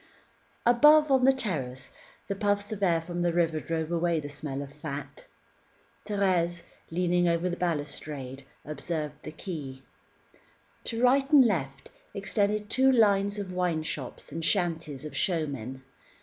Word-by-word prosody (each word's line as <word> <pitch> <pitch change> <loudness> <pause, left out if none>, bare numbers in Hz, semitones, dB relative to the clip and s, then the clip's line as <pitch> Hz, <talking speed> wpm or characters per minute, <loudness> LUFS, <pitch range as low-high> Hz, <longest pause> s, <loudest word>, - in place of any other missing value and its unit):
Above, 295 +5 +6
on 260 -1 +4
the 270 - +7
terrace, 140 - -3 0.4
the 200 - -1
puffs 205 +1 0
of 210 -2 -5
air 170 -4 +3
from 175 +1 -5
the 175 0 +2
river 165 -2 +1
drove 160 0 -3
away 170 -1 +1
the 145 - -6
smell 145 -1 -5
of 140 0 -11
fat. 140 -2 -7 0.8
Thérèse, 180 -4 +1 0.3
leaning 175 +1 +1
over 170 +1 +1
the 175 - -2
balustrade, 145 -5 -4 0.2
observed 150 +1 -4
the 155 - -7
quay. 145 -6 -7 1.0
To 230 +1 -2
right 270 +2 +4
and 280 -4 +8
left, 140 - -2 0.2
extended 205 +1 0
two 265 +4 +4
lines 205 -4 +3
of 195 -3 -5
wine 175 -3 0
shops 140 -4 -6
and 165 +3 -4
shanties 165 -7 -1
of 150 - -7
showmen. 135 - -2
170 Hz, 145 wpm, -28 LUFS, 150-205 Hz, 1.0 s, and